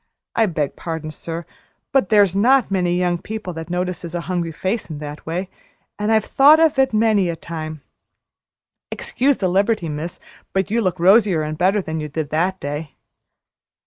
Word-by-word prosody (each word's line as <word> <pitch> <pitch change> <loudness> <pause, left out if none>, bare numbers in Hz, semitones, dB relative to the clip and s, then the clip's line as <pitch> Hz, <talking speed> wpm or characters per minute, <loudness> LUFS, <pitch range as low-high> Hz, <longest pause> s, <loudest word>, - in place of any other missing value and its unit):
I 225 -1 +3
beg 155 -6 -2
pardon, 160 -2 -5
sir, 165 +2 -6 0.5
but 270 -9 +2
there's 200 -3 +4
not 250 +3 +4
many 180 -2 +1
young 175 -1 0
people 210 -1 -6
that 160 0 -7
notices 180 -1 -3
a 175 - -2
hungry 175 -2 -2
face 190 +7 -2
in 155 - -5
that 150 +1 -8
way, 180 +4 -2 0.5
and 210 +1 0
I've 220 -1 +3
thought 295 +3 +6
of 320 -4 +3
it 265 - +4
many 215 -4 +2
a 170 - -2
time. 155 -2 -7 1.1
Excuse 275 +2 0
the 190 - 0
liberty, 195 -1 +1
miss, 155 +4 -5 0.3
but 190 0 0
you 230 +1 +2
look 185 -3 -1
rosier 190 -2 +4
and 155 0 -3
better 190 +4 +2
than 160 -1 -4
you 150 0 -5
did 150 0 -4
that 180 +5 0
day." 145 +1 -5
180 Hz, 175 wpm, -20 LUFS, 160-210 Hz, 1.1 s, thought